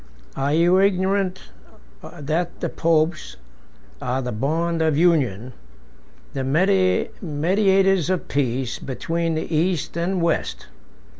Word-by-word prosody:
34 135 - -4
Are 140 +1 +1
you 175 +3 +4
ignorant 190 -1 +1 0.6
that 160 +4 -4
the - - -2
popes 160 - 0 0.6
are 125 +1 -1
the 125 - -3
bond 165 +8 -1
of 160 -2 +2
union, 130 - +1 0.8
the 135 - -2 0.8
mediators 190 +2 +2
of 185 -2 -1
peace, 130 -2 -1
between 165 +5 -2
the 160 +1 -3
East 170 0 0
and 180 +2 -1
West? 170 0 -1
165 Hz, 115 wpm, -22 LUFS, 140-180 Hz, 0.8 s, you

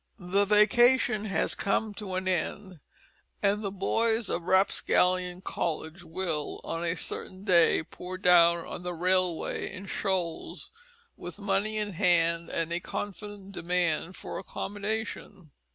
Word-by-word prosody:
The 195 +1 +1
vacation 230 +2 +4
has 195 -6 +1
come 210 +2 0
to 195 -3 -5
an 185 0 -2
end, 185 0 -2 0.6
and 205 +1 +2
the 200 - -1
boys 220 +2 0
of 170 -1 -2
Rapscallion 185 -1 +2
College 165 -1 -3
will, 165 -3 -3
on 165 +1 -3
a 170 0 0
certain 185 +2 -4
day, 170 -5 +4
pour 180 +3 -8
down 170 -2 +5
on - - -7
the 180 0 -4
railway 180 0 0
in 195 0 -8
shoals 185 -4 -3 0.4
with 175 +2 -8
money 205 +1 -1
in 210 -2 -2
hand 170 -1 +2
and 165 0 -2
a 170 - 0
confident 205 +1 -6
demand 175 -1 0
for - - -6
accommodation. 205 -4 -5
185 Hz, 135 wpm, -28 LUFS, 175-205 Hz, 0.6 s, down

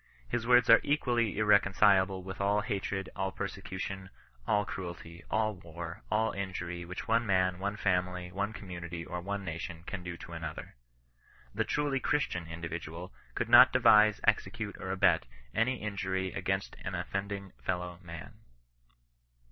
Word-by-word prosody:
His 115 - -2
words 125 0 +6
are 115 - +9
equally 120 -7 +1
irre 105 -1 +5
concilable 95 -1 +3
with 95 +1 -6
all 100 +1 +2
hatred, 100 -2 -3
all 95 0 -1
persecution, 95 -1 -5 0.4
all 105 0 +2
cruelty, 85 -2 -7
all 110 0 +1
war, 85 +1 -8
all 110 +1 +2
injury 90 -3 -4
which 90 +2 -6
one 115 +1 +3
man, 95 -3 +2
one 100 +2 -2
family, 90 -2 0
one 100 +3 -2
com 100 -3 -10
munity, 85 -1 -6
or 90 0 -4
one 100 +2 -4
nation, 85 0 -5
can 95 +1 -5
do 90 -1 -6
to 85 - -10
another. 80 -2 -6 0.8
T)ie - - +1
truly 145 -2 0
Christian 90 - 0
individual 85 +1 -6 0.2
could - - -1
not - - +9
devise, 105 -1 +6
execute, - - 0
or - - -5
abet - - +3 0.3
any 120 +3 +2
injury 95 -2 -2
against 95 0 -2
an - - -3
offending 100 -1 -4
fellow 90 0 -3
man. 85 -3 -10
95 Hz, 150 wpm, -31 LUFS, 90-105 Hz, 0.8 s, are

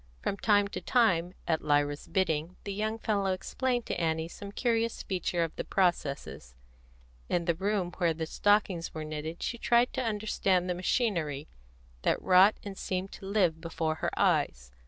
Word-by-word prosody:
From 200 - -1
time 205 -2 +3
to - - -5
time, 185 -7 +2
at 160 -2 +1
Lyra's 145 -1 +1
bidding, 170 -2 0
the 200 - -4
young 215 +2 -1
fellow 200 -4 0
explained 245 +6 -2
to - - -3
Annie 160 0 0
some 200 +3 -9
curious 230 0 0
feature 180 -2 -1
of 165 - -4
the - - -2
processes; 140 - -1 0.7
in 170 -1 0
the 170 - +2
room 190 0 -1
where 170 -3 +3
the 160 0 -3
stockings 195 -2 +1
were 155 - -3
knitted 155 +2 -5
she 235 - -3
tried 240 +1 +3
to - - -1
understand 205 -4 +1
the 180 - 0
machinery 175 - -1 0.5
that - - +1
wrought 190 +3 +6
and 200 -2 -7
seemed 185 +1 -3
to 195 - -9
live 180 -6 +2
before 165 -1 -1
her - - +1
eyes. - - +1
185 Hz, 170 wpm, -30 LUFS, 160-205 Hz, 0.7 s, wrought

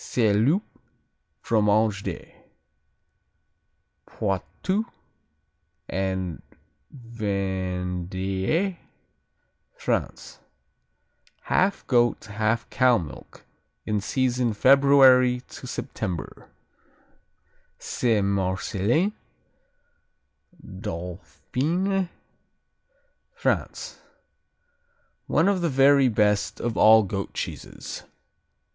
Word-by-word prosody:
Saint 110 -1 +2
Loup, 185 +9 +2 0.8
Fromage 105 -1 +2
de - - -7 1.7
Poitou 100 - -2 1.0
and 95 -3 -3 0.7
Vendée, 95 - -2 1.0
France - - -3 1.0
Half 195 +2 +1
goat, 120 -3 +2
half 110 +2 -1
cow 125 -2 +4
milk, 75 -9 -9 0.4
in 105 -1 -1
season 125 0 0
February 130 -1 +5
to 125 - -11
September 105 -9 -5 1.3
Saint 110 -5 0
Marcellin 100 - 0 1.5
Dauphiné, 105 - -3 1.3
France 470 - -2 1.3
One 165 - +2
of 200 -2 +1
the 170 - +1
very 135 -1 +5
best 105 -2 +1
of 120 -1 -2
all 110 0 +7
goat 95 0 -5
cheeses. - - -6
110 Hz, 65 wpm, -25 LUFS, 95-135 Hz, 1.7 s, all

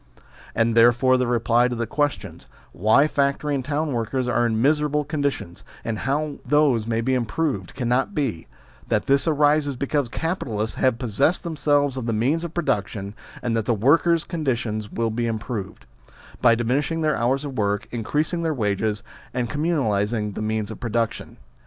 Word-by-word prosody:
And 115 0 +2
therefore 120 +3 +5
the 125 -1 0
reply 120 0 +3
to 125 - -3
the 115 0 -2
questions, 145 +2 -3 0.2
why 110 +9 +4
factory 140 0 0
and 135 -2 -1
town 145 +2 -1
workers 125 +2 -1
are 120 0 +2
in 110 -1 0
miserable 150 +2 +2
con 150 +1 -3
ditions, 135 -11 -3 0.2
and 110 -2 -2
how 145 +3 -1
those 140 -7 +2
may 115 0 0
be 130 +3 0
improved, 125 - -2
cannot 130 +7 0
be, 125 - -2 0.4
that - - 0
this 140 +3 +2
arises 150 -2 +2
because 140 0 -1
capitalists 115 - -3
have 130 -3 +2
pos 120 -3 -5
sessed 140 - +2
themselves 145 -4 +1
of 125 -2 -4
the 115 - 0
means 135 +10 +1
of 170 -1 -6
production, 100 - -2 0.3
and 120 -2 0
that 110 -2 0
the 120 - +2
workers' 165 +9 +3
condition 120 - -2
will 115 -1 -1
be 120 +1 -1
improved: 110 -3 -5 0.6
by 120 -2 +6
diminishing 135 +7 0
their 155 -1 +2
hours 135 +4 0
of 140 -2 -6
work, 100 -1 -1
increasing 150 +9 -1
their 160 -2 -1
wages, 105 -2 -1 0.3
and 120 -3 -1
communalising 110 -9 0
the - - -5
means 110 0 -2
of 110 - -8
produc 115 -2 0
tion. - - -11
125 Hz, 175 wpm, -23 LUFS, 115-145 Hz, 0.6 s, by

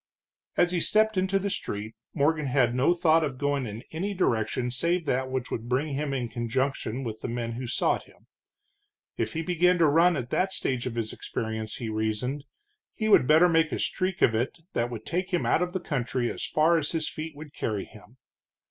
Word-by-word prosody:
As 175 0 +4
he 180 - +1
stepped 220 +3 +3
into 190 +1 +2
the 195 +1 -2
street, 105 - -4 0.2
Morgan 155 0 +2
had 125 -2 +2
no 130 +8 +3
thought 165 -1 +4
of 140 -4 -2
going 140 -2 0
in 110 +2 -7
any 195 +6 -3
direction 120 - 0
save 170 +7 0
that 130 -1 0
which 130 -1 -3
would 115 +1 -4
bring 135 +5 +1
him 145 +1 -2
in 130 -3 -1
conjunction 125 +1 -2
with 110 -3 -5
the - - -3
men 120 -1 -3
who 120 +2 -5
sought - - 0
him. - - -22 0.9
If - - -2
he 165 0 -2
began 180 +2 +3
to 170 - +4
run 165 +4 +5
at 125 -3 -4
that 190 +1 +1
stage 130 -2 -1
of 120 - -4
his 115 -2 -2
experiences, 110 -1 -4
he 115 -3 -4
reasoned, 110 +6 -2 0.5
he 220 -2 -1
would 130 -11 +6
better 160 +4 +7
make 165 -2 +3
a - - -1
streak 185 0 -1
of 115 - +5
it 120 +4 -1 0.2
that 120 +1 0
would 115 -2 -7
take 180 +2 -2
him 175 - +1
out - - +3
of 180 0 0
the 185 - -2
country 125 -6 -1
as - - -6
fast 165 +2 +3
as - - -4
his 160 -2 -1
feet 155 0 -6
would 150 0 -10
carry 105 -3 -2
him. 110 +4 -17
140 Hz, 210 wpm, -27 LUFS, 120-170 Hz, 0.9 s, better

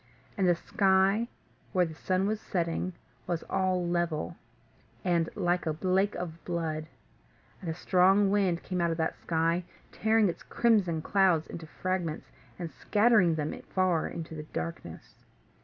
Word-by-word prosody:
And 195 -3 +2
the 175 - +5
sky 195 +5 +2 0.5
where 180 -2 +4
the 160 - -7
sun 185 +4 0
was 215 +1 -1
setting 175 0 -2 0.3
was 175 -2 -1
all 185 -2 0
level, 170 - -1 0.7
and 170 -2 +2
like 180 -3 0
a 155 -1 -1
lake 190 +2 +2
of 165 -2 -6
blood; 160 -3 -2 0.7
and 175 - -4
a 160 - -2
strong 190 +3 +4
wind 190 -4 +1
came 180 -1 -2
out 170 - +2
of 165 - -1
that 160 -1 -2
sky, 165 +1 +1 0.3
tearing 220 0 +3
its 170 - -3
crimson 195 -9 +2
clouds 185 -5 +3
into 165 -2 -8
fragments, 175 -2 -3 0.3
and 170 -3 -5
scattering 210 -6 +3
them 150 -1 -2 0.2
far 185 -4 +2
into 160 -1 -6
the 155 - -5
darkness. 80 +1 -7
180 Hz, 150 wpm, -29 LUFS, 165-190 Hz, 0.7 s, the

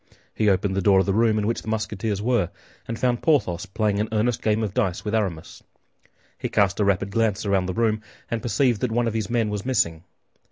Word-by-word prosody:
He 105 -1 +2
opened 95 0 +1
the 95 - +1
door 95 +1 +4
of 95 - +2
the 100 - +1
room 110 0 +3
in 105 - 0
which 115 +2 -1
the - - -15
Musketeers 105 -1 -2
were, 120 -7 +1 0.4
and 115 - -4
found 120 -1 0
Porthos 105 - +1
playing 105 +1 0
an 105 - -1
earnest 110 +2 0
game 110 0 +1
of 105 -3 -3
dice 95 -1 -1
with 105 - -2
Aramis. 95 -8 -2 0.8
He - - -3
cast 100 0 +2
a - - +3
rapid 100 0 +1
glance 110 -2 0
around 95 -2 +1
the 95 - -3
room, 110 -2 +1 0.3
and 115 -1 -1
perceived 120 -2 +1
that 125 - 0
one 120 +1 +1
of 115 - -1
his 110 -3 -2
men 115 -3 0
was 105 -1 -3
missing. 85 -11 0
105 Hz, 230 wpm, -24 LUFS, 100-115 Hz, 0.8 s, door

